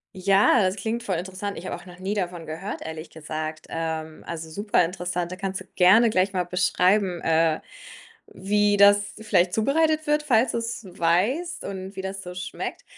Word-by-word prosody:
Ja, 195 +5 +4
das 190 +1 +1
klingt 230 +3 -3
voll 195 -5 -1
interessant. 190 +3 -5
Ich 175 - -8
habe - - -3
auch - - -12
noch 180 0 -13
nie 195 +2 -2
davon 175 -4 -3
gehört, 165 +6 -6
ehrlich 160 +1 -7
gesagt, 155 0 -6
ähm, 160 -1 -4
also, 160 -1 -6
superinteressant. 180 -2 -1
Da - - -4
kannst 190 -1 -4
du - - -11
gerne 220 +6 +6
gleich 190 -1 +2
mal 180 -1 +1
beschreiben, 180 +1 +2
äh, 160 -1 +2 0.7
wie 205 +1 +1
das 205 0 +5
vielleicht 185 -5 +2
zubereitet 310 +7 +2
wird, 300 0 +2
falls 245 -4 +3
du's 230 -2 -3
weißt 190 - 0
und 190 0 -6
wie 190 - -4
das 195 +1 -5
so 180 0 -7
schmeckt. 180 0 -6
190 Hz, 175 wpm, -25 LUFS, 175-205 Hz, 0.7 s, gerne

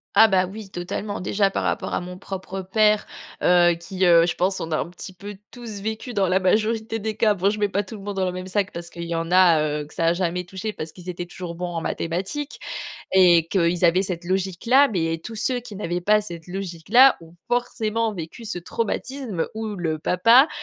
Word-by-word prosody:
Ah 225 - +8
bah, 190 -3 +3
oui, 200 +2 -9
totalement. 195 +3 -4
Déjà 200 +2 +1
par - - -2
rapport - - -1
à - - 0
mon 180 +1 -8
propre 190 0 -6
père, 210 +2 +2 0.3
heu, 175 -1 +5
qui, 185 +3 -2
heu, 170 -1 +6
je 175 - -1
pense, 190 +2 0
on 165 - -5
a 155 - +1
un - - -2
petit 180 +2 -9
peu 200 +2 -9
tous 230 -5 -8
vécu 220 +4 -4
dans 200 -3 +2
la 185 +1 +3
majorité 220 +4 +1
des 215 0 -3
cas- 215 -2 +4
bon, 195 0 +1
je 210 - -2
mets 205 - +2
pas 200 0 0
tout 205 +2 -9
le 205 - -10
monde 205 0 -5
dans 190 - +1
le - - -1
même 185 0 -6
sac 195 +1 -1
parce 170 0 -8
qu'il 170 0 -6
y 170 0 -3
en 165 +1 -3
a, 180 -3 +6 0.2
heu, - - -6
que - - -17
ça 165 - -1
a 165 - +4
jamais 180 0 -2
touché 190 +4 -5
parce 160 -6 -7
qu'ils 180 +2 -10
étaient 175 0 -4
toujours 175 -1 -7
bons 180 +1 -4
en 165 - -2
mathématiques 195 - -3 0.5
et 175 -3 +6
qu'ils 175 -1 +1
avaient 175 +2 +5
cette 180 -3 -4
logique-là- 195 +9 +3
mais 165 -3 0
tous 230 - -7
ceux 245 +3 0
qui 225 -4 -10
n'avaient 175 -3 -2
pas 210 +4 +3
cette 170 -5 -8
logique-là 195 +7 +3
ont 165 0 -15
forcément 230 -2 0
vécu 175 +6 -8
ce 180 - -4
traumatisme 225 +1 -3
où 220 -1 -4
le 160 -3 -2
papa 230 - +5
190 Hz, 225 wpm, -23 LUFS, 175-215 Hz, 0.5 s, Ah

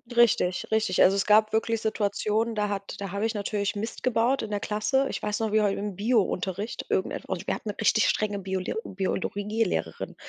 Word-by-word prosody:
Richtig, 210 -6 +3
richtig. 220 -4 +2
Also, 195 +2 +5
es 195 - +1
gab 215 +1 +5
wirklich 225 0 +1
Situationen, 220 +1 0
da 210 -1 0
hat 200 -1 -4
da 195 -2 -5
habe 200 +2 -1
ich 225 - 0
natürlich 205 0 -2
Mist 220 +3 -5
gebaut 250 +2 +2
in 220 - -5
der 205 - 0
Klasse. 215 +7 0
Ich - - -4
weiß 210 0 -2
noch, 220 -2 -1
wie 215 0 +4
heu 200 -1 +2
im 205 -2 -4
Biounterricht 205 -2 -1
irgendetwa - - -2
und - - -7
wir - - +1
hatten - - -7
'ne - - -4
richtig - - +3
strenge 205 -1 0
Biole 190 -1 -3
Biologielehrerin. 205 +3 -2
210 Hz, 200 wpm, -27 LUFS, 200-220 Hz, -, Also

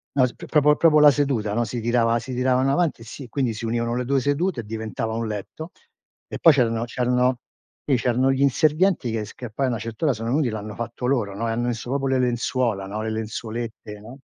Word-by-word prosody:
No 130 -2 +5
s 125 - -4
proprio- 150 0 +2
proprio 155 -1 +5
la 150 -1 +8
seduta, 135 -8 0
no, 120 +2 +1
sii 115 +2 -4
tirava 115 0 +2
si 125 +2 -7
tiravano 130 +1 +2
avanti 165 -4 0
e - - -9
si 125 +3 -9
quindi 130 -2 -1
si 110 +2 -6
univano 115 +1 -1
le 125 0 -2
2 135 +1 +2
sedute 145 +2 0
e - - -13
diventava 110 +1 -4
un 115 0 -2
letto 110 - -6 0.6
e - - -7
poi 165 - +7
c'erano 115 -4 +1
c'erano 125 +1 +1 0.5
lì 140 - +2
c'erano 125 +2 +2
gli 135 0 0
inservienti 155 0 +2
che 110 -1 -2
s 105 - -12
che 120 -3 -8
poi 135 +5 -1
a - - 0
una 120 - -1
certa 115 +6 -5
ora 145 - +3
sono 115 +1 -4
venuti, 135 0 +1
l'hanno 105 -1 -5
fatto 120 +2 -5
loro, 120 -7 0
no, 115 +3 -2
e - - -1
hanno 120 +2 -1
messo 120 0 -4
proprio 135 0 0
le 130 0 +2
lenzuola, 120 -4 0
no, 105 +2 -4
le 110 - -2
lenzuolette, 110 0 -5
no? 120 +6 -12
120 Hz, 235 wpm, -23 LUFS, 115-135 Hz, 0.6 s, la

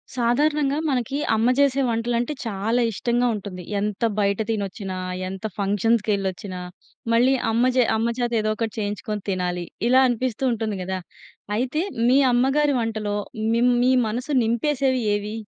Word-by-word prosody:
సాధారణంగా 280 +4 +1
మనకీ 265 -1 -1 0.2
అమ్మ 225 +3 +2
చేసే 275 -1 +3
వంటలంటే 235 +3 -1
చాలా 225 +3 0
ఇష్టంగా 240 +3 0
ఉంటుంది. 195 -3 -7 0.2
ఎంత 205 -1 -3 0.2
బయట 200 -1 +2
తినొచ్చినా, 200 -3 -3 0.3
ఎంత 190 0 -7
ఫంక్షన్స్‌కెళ్ళొచ్చినా, 200 -2 0 0.5
మళ్ళీ 250 +3 +4 0.2
అమ్మ 240 +3 +3
జే 250 - +6
అమ్మ 225 +1 0
చేత 240 -1 -1
ఏదో 215 0 0
ఒకటి 225 -1 -3
చేయించుకొని 210 0 -3
తినాలి. 180 -2 -2 0.2
ఇలా 260 +1 +6
అనిపిస్తూ 245 0 -2
ఉంటుంది 220 -3 -2
గదా! 190 +1 -3 0.6
అయితే 260 +6 -1 0.3
మీ 260 - +5 0.2
అమ్మగారి 270 +4 +2
వంటలో 215 -2 -2 0.4
మిమ్ 245 +2 +3
మీ 255 - +4 0.2
మనసు 245 +7 -3
నింపేసేవి 260 +3 +1
ఏవి? 205 +1 -4
230 Hz, 135 wpm, -23 LUFS, 205-250 Hz, 0.6 s, జే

